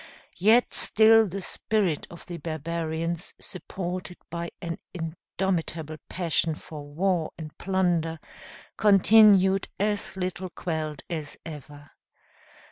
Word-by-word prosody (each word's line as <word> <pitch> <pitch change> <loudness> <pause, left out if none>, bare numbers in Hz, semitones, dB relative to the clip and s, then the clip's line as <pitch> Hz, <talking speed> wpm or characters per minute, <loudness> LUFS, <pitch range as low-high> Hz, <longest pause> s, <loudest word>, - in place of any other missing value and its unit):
Yet 220 +6 +5
still 225 0 +5
the 195 +2 -4
spirit 190 -5 0
of 170 - -11
the 175 -2 -6
barbarians, 165 +1 -3
supported 180 -1 -5
by 170 0 -3
an 170 -1 -5 0.2
indomitable 165 -1 -3
passion 165 -3 0
for 155 -1 -9
war 170 +2 0
and 155 -2 -8
plunder, 175 -4 +1 0.6
continued 195 -1 +6
as 205 -1 -1
little 185 0 -3
quelled 155 -4 -4
as 155 -4 -5
ever. 145 -2 -10
170 Hz, 105 wpm, -27 LUFS, 160-190 Hz, 0.6 s, continued